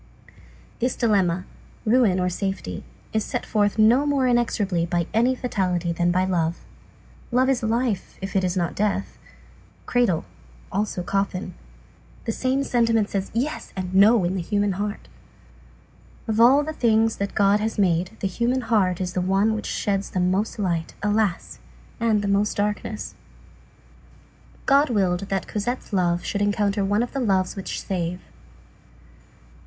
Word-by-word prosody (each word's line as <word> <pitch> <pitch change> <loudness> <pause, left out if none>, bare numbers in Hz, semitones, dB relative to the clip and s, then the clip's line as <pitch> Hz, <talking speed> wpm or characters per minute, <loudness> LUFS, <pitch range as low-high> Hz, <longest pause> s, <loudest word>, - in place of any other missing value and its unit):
This 250 +2 0
dilemma, 190 -6 +1 0.4
ruin, 220 -5 +3
or 180 - +1
safety, 195 +2 -3 0.3
is 220 -1 +1
set - - -4
forth 205 -1 +1
no 235 +7 +5
more 280 -2 +2
inexorably 210 -7 +1
by 170 0 0
any 240 +4 +3
fatality 180 -8 -1
than 175 +1 +1
by 185 +1 +2
love. 170 -2 -1 0.7
Love 255 +2 +3
is 265 -2 +1
life, 230 -2 -1
if 195 +1 -6
it 190 - +2
is 180 0 0
not 175 -2 0
death. 200 -1 -2 0.7
Cradle; 235 -10 +1 0.5
also 200 -2 -2
coffin. 195 -1 -2 0.7
The 225 - 0
same 260 +4 0
sentiment 230 -5 +1
says 195 -1 -2
"yes" 270 +6 -2
and 185 -1 -4
"no" 205 +2 +6
in 175 +1 0
the 185 - -1
human 205 +3 0
heart. 205 +2 -4 1.2
Of 220 0 0
all 265 +5 +6
the 315 +1 -4
things 225 -4 +2
that 200 0 -3
God 200 0 +4
has 220 +1 -2
made, 180 +1 +1
the 195 - +1
human 240 +7 0
heart 205 -6 +1
is 180 -1 -3
the 185 - 0
one 195 +4 +2
which 215 - -4
sheds 200 -1 -1
the 185 - -2
most 185 +6 0
light, 170 -5 -2
alas! 210 -3 0 0.4
and 220 -3 +2
the - - -1
most 200 +1 +1
darkness. 210 +1 -2 1.5
God 280 +2 +4
willed 195 -4 0
that 195 -1 -2
Cosette's 225 +2 -4
love 175 -2 +1
should 205 - -2
encounter 205 0 +1
one 205 +4 +1
of 245 - -5
the 275 - -2
loves 190 -6 +1
which 195 - -4
save. 180 -2 -2
205 Hz, 155 wpm, -24 LUFS, 185-225 Hz, 1.5 s, no